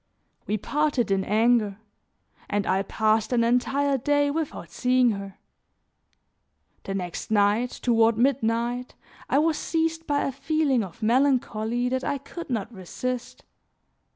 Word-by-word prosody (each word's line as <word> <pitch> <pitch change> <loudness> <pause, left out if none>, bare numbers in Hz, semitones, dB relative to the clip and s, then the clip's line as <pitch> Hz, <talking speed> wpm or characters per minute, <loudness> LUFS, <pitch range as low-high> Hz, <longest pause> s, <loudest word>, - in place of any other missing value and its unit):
We 215 - 0
parted 280 -1 0
in 195 -1 +2
anger, 215 -1 +2 0.7
and 205 -1 0
I 190 +1 +1
passed 220 +2 +1
an 240 -2 +3
entire 270 +4 +1
day 290 +2 +2
without 315 0 -4
seeing 250 -1 +3
her. 195 -1 -6 1.5
The 195 - -3
next 180 -3 -5
night, 210 +3 +2
toward 230 -3 +2
midnight, 240 -1 0 0.3
I - - +3
was 315 +1 +2
seized 325 0 -1
by 285 -1 +1
a - - -1
feeling 275 -3 0
of 190 +3 -10
melancholy 245 -1 +1
that 260 +1 -1
I 280 - -1
could 310 +5 -9
not 230 -2 -3
resist. 235 +6 -5
245 Hz, 130 wpm, -25 LUFS, 215-275 Hz, 1.5 s, an